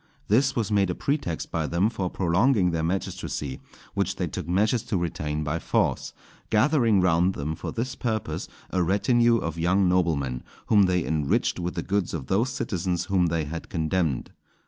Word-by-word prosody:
This 130 +5 +3
was 110 -3 -1
made 100 -2 +3
a 90 - -1
pretext 140 - -2
by - - -1
them 85 +5 +2
for 95 -5 -2
prolonging 95 +3 +2
their 85 -1 -1
magistracy, 80 -5 -3 0.3
which - - -1
they - - -1
took - - -5
measures 105 +6 +2
to 100 - -1
retain 75 -3 -2
by 80 +3 -2
force, - - 0 0.4
gathering 115 -3 +3
round 90 +1 +3
them 75 +3 -3
for 80 - -5
this 120 +2 -3
purpose 110 -4 -3 0.2
a 90 - +1
retinue 115 +6 +3
of 85 -6 -4
young 95 +3 +3
noblemen, 80 -9 +1 0.2
whom 105 -3 +5
they 90 -2 +1
enriched 75 +1 0
with 90 0 -3
the 85 - -2
goods 100 -3 -1
of 70 -5 -5
those 105 - +1
citizens 90 -7 -2
whom 90 -2 +4
they 80 -1 0
had 80 +3 -6
condemned. 80 -4 -1
90 Hz, 175 wpm, -26 LUFS, 80-105 Hz, 0.4 s, whom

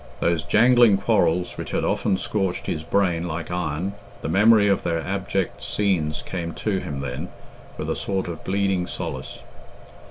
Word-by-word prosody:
Those 85 -1 +1
jangling 120 +1 +5
quarrels 90 -4 +1
which - - -5
had - - -1
often 95 - +1
scorched 95 -2 -2
his 75 - -2
brain 90 -1 +1
like 85 +1 -4
iron 90 +2 -2 0.3
the - - -2
memory 105 +4 +5
of 100 -1 +2
their 85 -1 -1
abject 95 +1 -2
scenes 80 -7 0
came 85 -3 -4
to 100 -3 -1
him 70 -6 -5
then, 70 +6 -4 0.5
with - - -4
a - - -1
sort 95 -2 -2
of 85 -2 -6
bleeding 95 -2 0
solace! - - -6
90 Hz, 160 wpm, -24 LUFS, 85-100 Hz, 0.5 s, jangling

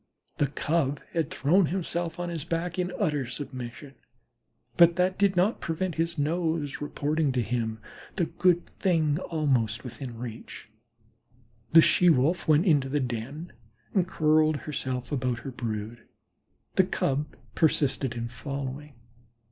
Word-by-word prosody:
The 145 - +3
Cub 145 0 0
had 165 -3 0
thrown 170 +6 +3
himself 170 -1 -2
on 175 0 -2
his 165 -4 -4
back 170 +2 -2
in 180 0 -1
utter 150 - 0
submission, 130 +1 -7 0.8
but 170 -1 +6
that 185 +1 +1
did 200 -1 +3
not 190 +6 +2
prevent 170 +2 -2
his 165 +1 -1
nose 160 -1 -1
reporting 145 0 0
to 125 - +1
him 110 -1 -2 0.4
the 175 - +1
good 175 0 +2
thing 160 -5 +2
almost 130 - 0
within 125 -1 -7
reach. 115 -2 -8 1.0
The 165 - +10
She 180 - +5
wolf 155 +4 +2
went 155 +3 +4
into 145 -7 +3
the 145 +2 +1
den 130 +6 -4 0.4
and 185 -4 +2
curled 155 -3 +3
herself 130 -4 -3
about 125 -4 -1
her 135 - -4
brood; 115 -1 -5 0.7
the - - +7
Cub 140 +3 -1 0.2
persisted 140 -5 +1
in 120 0 -3
following. 140 +4 -6
150 Hz, 140 wpm, -27 LUFS, 130-170 Hz, 1.0 s, The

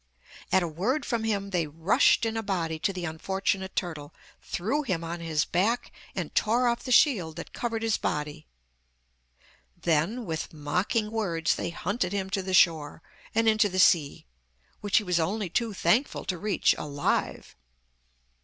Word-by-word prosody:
At 190 - +4
a - - -1
word 210 - -1
from 230 -3 -1
him 200 -2 -1
they 170 -4 0
rushed 165 +9 +3
in 225 0 -2
a 225 - -1
body 170 -6 -2
to 195 - 0
the 180 -2 -5
unfortunate 190 +4 -2
turtle, 155 -5 -4 0.3
threw 225 +12 -1
him 185 - -2
on 170 +1 -5
his 160 -3 0
back, 215 +8 0 0.2
and - - -4
tore 240 +3 +2
off 235 0 0
the 255 - -3
shield 200 - +4
that 170 - -8
covered 230 -2 -3
his 225 -2 +1
body. 150 - -3 1.3
Then 175 +9 0
with 160 -2 -4
mocking 185 +9 -1
words 175 -8 0
they - - -3
hunted 185 +2 -2
him 190 -1 -2
to 200 -1 0
the 185 0 -1
shore, 160 -3 +3 0.3
and 225 0 +3
into 215 -1 +4
the 185 - -4
sea, 170 -6 +3 0.5
which 205 -1 +1
he - - +3
was 180 -3 +1
only 190 +3 -1
too 230 +2 0
thankful 205 +8 +1
to 185 - -2
reach 210 +1 +2
alive. 145 -1 -2
190 Hz, 165 wpm, -27 LUFS, 165-220 Hz, 1.3 s, At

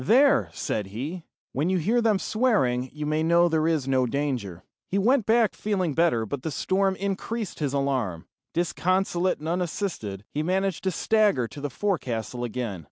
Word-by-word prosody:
"There," 265 - +4
said 105 -3 -3
he, 140 - -5 0.3
"when 150 +6 0
you 190 - +2
hear 220 +9 +2
them 220 -3 +3
swearing, 185 - +1
you 150 0 -5
may 155 +1 0
know 170 +2 +4
there 160 -1 +1
is 155 -5 0
no 130 -2 +2
danger." 120 - -2 0.3
He 195 - 0
went 235 +3 +3
back 225 -1 +4
feeling 185 -7 -1
better, 160 -8 +2
but 125 +5 -4
the 160 - -3
storm 190 +6 +1
increased 200 +2 -3
his 145 -3 0
alarm. 130 -12 -1 0.3
Disconsolate 180 +1 +1
and 155 - -7
unassisted, 165 - -3
he 150 - -1
managed 190 +2 -1
to 190 - +2
stagger 205 - +2
to 140 - -9
the 145 - -2
forecastle 125 - -2
again. 120 -5 -3
160 Hz, 170 wpm, -26 LUFS, 130-195 Hz, 0.3 s, There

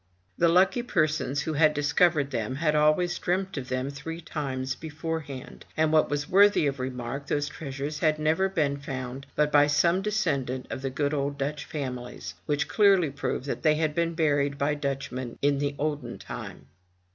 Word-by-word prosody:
The 170 - +3
lucky 185 +8 +4
persons 155 - 0
who 160 - -2
had 150 0 +4
discovered 145 0 +2
them 115 +1 -2
had 150 +1 +1
always 155 +4 +3
dreamt 190 +2 -1
of 130 -2 -5
them 130 +2 -2
three 165 +4 -6
times 135 -5 -3
beforehand, 155 -3 -6
and 155 0 +2
what 155 - +4
was 145 0 -2
worthy 200 -2 +5
of 140 -1 -1
remark, 130 +2 -4
those 145 0 0
treasures 145 0 -5
had 155 -2 +2
never 160 +5 +2
been 145 -6 0
found 135 -1 -6
but 150 0 +2
by 145 0 +6
some 170 +5 +3
descendant 145 - -1
of 130 - -4
the 135 - -2
good 145 +3 -1
old 140 0 -1
Dutch 145 +2 -3
families, 125 - -5
which 150 +1 0
clearly 195 -7 +4
proved 140 -1 -3
that 145 - -3
they 155 -1 +4
had 155 -1 0
been 170 +1 0
buried 145 -3 +1
by 140 +2 +1
Dutchmen 135 -4 -4
in 140 0 +2
the 145 0 -1
olden 150 0 -3
time. - - -8
145 Hz, 180 wpm, -27 LUFS, 140-160 Hz, -, by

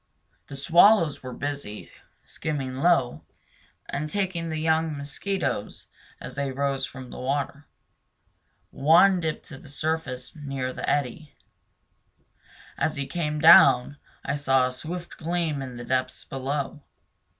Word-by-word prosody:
The 140 - -8
swallows 170 +3 +5
were 130 - -7
busy, 140 -6 -5 0.3
skimming 135 -4 -4
low, 135 -5 +2 0.7
and 150 +2 -3
taking 185 -3 -2
the 160 - -3
young 160 -1 +1
mosquitoes 140 - -3 0.3
as - - -8
they 140 -1 -2
rose 135 0 -1
from 130 -1 -10
the - - -8
water. 140 +2 -3 1.0
One 175 +6 +5
dipped 160 -2 -3
to 135 - -9
the - - -15
surface 145 -3 -3
near 135 -4 -4
the - - -3
eddy. 145 +2 -2 1.4
As 155 +2 0
he 140 -1 -3
came 150 0 -2
down 145 -3 +7 0.3
I 140 - -1
saw 135 -2 +3
a 125 - -3
swift 170 +6 -7
gleam 165 -3 -1
in 130 -2 -7
the 120 - -7
depths 130 +1 -1
below. 140 +2 -4
145 Hz, 130 wpm, -26 LUFS, 135-160 Hz, 1.4 s, down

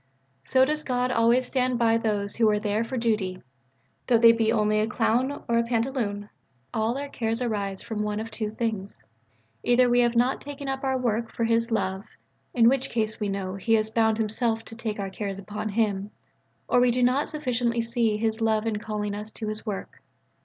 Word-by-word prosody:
So 260 0 +4
does 305 +2 -1
God 250 -2 0
always 235 +2 +3
stand 255 -1 0
by 230 -1 +3
those 205 -3 -1
who 225 -2 +4
are 210 0 +2
there 210 +1 0
for 255 +3 -4
duty 210 -6 -1 0.6
though 240 - +5
they 230 0 +8
be 225 -1 +1
only 215 -1 +2
a 215 - +1
clown 240 +5 0
or 235 -1 +3
pantaloon. 230 -3 -1 0.5
All 225 +3 0
our 285 +1 -4
cares 230 -4 -2
arise 205 -5 -2
from 215 -2 -4
one 210 0 -2
of 225 +1 -6
two 215 -1 -3
things: 210 - -4 0.6
either 245 - +4
we 245 0 +3
have 240 -1 +3
not 245 +3 +2
taken 280 0 -7
up 270 0 -3
our 265 -1 +1
work 230 -2 -1
for 230 - -3
His 230 +1 +2
love, 190 -4 -1 0.5
in 230 -2 +6
which 265 +1 +2
case 220 -1 -2
we 210 -2 -1
know 195 -1 -3
He 210 +4 +1
has 215 0 0
bound 220 -1 +2
Himself 225 +1 0
to 225 - -10
take 220 -2 -4
our 195 -1 -3
cares 195 0 -4
upon 210 +2 -5
Him: 205 -2 0 0.6
or - - +4
we 250 0 +4
do 245 +1 +1
not 255 +4 +2
sufficiently 245 -5 -1
see 230 -2 0
His 220 +1 -1
love 220 -1 +1
in 220 -2 -1
calling 210 -2 -3
us 210 +1 -6
to 220 - -5
His 215 +1 -6
work. 200 -2 -5
225 Hz, 205 wpm, -26 LUFS, 210-245 Hz, 0.6 s, they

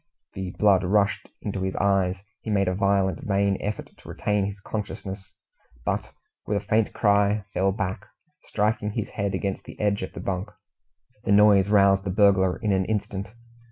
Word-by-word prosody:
The 95 -1 -4
blood 100 -3 +4
rushed 100 +2 +1
into 100 -2 -3
his 95 0 -2
eyes 95 -2 +2
and - - -20
ears. 95 - -23 0.2
He - - -6
made 100 -2 +2
a 90 - +1
violent, 100 0 +1
vain 100 -1 +1
effort 105 +1 -4
to - - -15
retain 105 -1 0
his 100 0 -7
consciousness, 95 -1 -6 0.5
but - - -2 0.4
with 105 - +1
a 100 - -5
faint 110 +1 +2
cry 100 -1 +2
fell 95 +1 +2
back, 95 -1 -4 0.4
striking 105 0 -1
his - - -3
head 100 -1 -2
against 100 -1 -3
the - - -11
edge 105 -1 +1
of 95 - -5
the - - -7
bunk. 95 0 -3 0.7
The - - -1
noise 100 -1 +6
roused 100 -2 +4
the 95 - -3
burglar 95 -2 +3
in 105 -3 -1
an 95 -1 +2
instant. 100 -2 -3
100 Hz, 185 wpm, -25 LUFS, 95-105 Hz, 0.7 s, noise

